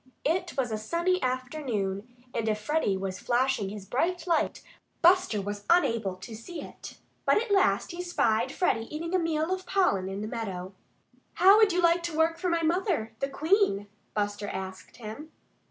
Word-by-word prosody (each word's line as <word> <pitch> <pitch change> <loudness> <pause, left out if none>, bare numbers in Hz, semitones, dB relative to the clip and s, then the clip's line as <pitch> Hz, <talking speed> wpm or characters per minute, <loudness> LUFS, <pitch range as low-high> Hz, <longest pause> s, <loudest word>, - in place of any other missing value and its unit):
It 345 +2 0
was 250 -3 0
a 215 - -2
sunny 345 +10 0
afternoon; 250 -6 -2 0.3
and 225 -1 -1
if 215 0 0
Freddie 215 -4 0
was 190 -1 -4
flashing 245 -4 +1
his 205 -1 -8
bright 335 - -1
light, 335 -3 0 0.4
Buster 360 - +5
was 205 0 -5
unable 230 - +3
to 190 +5 -10
see 280 +11 -8
it. - - -10 0.3
But - - +4
at 460 -1 -4
last 390 -2 +3
he 345 +1 -5
spied 250 -9 +1
Freddie 225 -11 0
eating 330 +3 -4
a 370 - +4
meal 325 +1 0
of 375 0 -5
pollen 200 - +2
in 195 +1 -4
the 215 - -3
meadow. 195 -5 -5 0.6
"How 385 +4 +7
would 430 -2 +5
you 355 0 +1
like 340 +1 +4
to 340 -2 -4
work 325 +1 +2
for 365 - 0
my 335 -1 +1
mother, 330 - 0
the 275 - -1
Queen?" 315 - +2 0.3
Buster 205 0 -1
asked 190 -1 -7
him. 235 +8 -8
270 Hz, 180 wpm, -28 LUFS, 210-345 Hz, 0.6 s, How